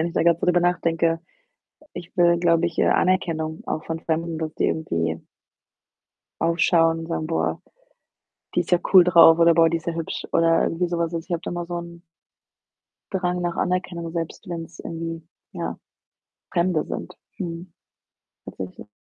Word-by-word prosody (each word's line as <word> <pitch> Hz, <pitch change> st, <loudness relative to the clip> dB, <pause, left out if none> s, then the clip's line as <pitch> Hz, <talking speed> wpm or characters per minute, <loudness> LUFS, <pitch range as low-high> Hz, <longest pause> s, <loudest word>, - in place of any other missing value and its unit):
wenn 160 Hz, -, +1 dB
ich -, -, -9 dB
da -, -, +2 dB
grad 170 Hz, 0 st, +3 dB
drüber 175 Hz, 0 st, +3 dB
nachdenke. 165 Hz, -1 st, +1 dB, 0.7 s
Ich 175 Hz, 0 st, -9 dB
will, 170 Hz, -1 st, +4 dB
glaube 170 Hz, -1 st, +3 dB
ich, 170 Hz, -1 st, -4 dB
äh, -, -, +4 dB
Anerkennung 165 Hz, -4 st, +1 dB
auch 155 Hz, -, -3 dB
von 165 Hz, 0 st, -4 dB
Fremden, 165 Hz, 0 st, -2 dB
dass 155 Hz, -1 st, -4 dB
die -, -, +1 dB
irgendwie 85 Hz, -, -2 dB, 1.2 s
aufschauen 165 Hz, -1 st, +3 dB
und 165 Hz, -, -7 dB
sagen: 160 Hz, -2 st, -3 dB
„Boah, 80 Hz, -, -1 dB, 0.9 s
die -, -, +3 dB
ist 175 Hz, -, -8 dB
ja 175 Hz, -, +5 dB
cool 185 Hz, -2 st, +10 dB
drauf,“ 170 Hz, -2 st, +7 dB
oder 170 Hz, 0 st, +6 dB
„Boah, 165 Hz, -1 st, +5 dB
die 165 Hz, -, 0 dB
ist 165 Hz, -, -14 dB
ja 170 Hz, -, 0 dB
hübsch“ 165 Hz, -1 st, -4 dB
oder 165 Hz, 0 st, +3 dB
irgendwie 175 Hz, +2 st, 0 dB
so 170 Hz, 0 st, -2 dB
was. 165 Hz, -1 st, 0 dB
Ich 165 Hz, +2 st, -5 dB
habe 170 Hz, -, -1 dB
da -, -, -4 dB
mal 175 Hz, 0 st, -3 dB
so 175 Hz, 0 st, -4 dB
'n 170 Hz, 0 st, -10 dB, 1.1 s
Drang 180 Hz, -1 st, -1 dB
nach 175 Hz, -1 st, -2 dB
Anerkennung, 180 Hz, -2 st, -2 dB
selbst 170 Hz, +4 st, -5 dB
wenn's 165 Hz, -1 st, -7 dB
irgendwie, 165 Hz, -1 st, -6 dB, 0.2 s
ja, -, -, -5 dB, 0.7 s
Fremde 170 Hz, -3 st, +1 dB
sind, -, -, -6 dB, 0.2 s
mhm, 170 Hz, -1 st, -6 dB, 0.7 s
tatsächlich. 95 Hz, +2 st, -8 dB
170 Hz, 170 wpm, -23 LUFS, 165-175 Hz, 1.2 s, cool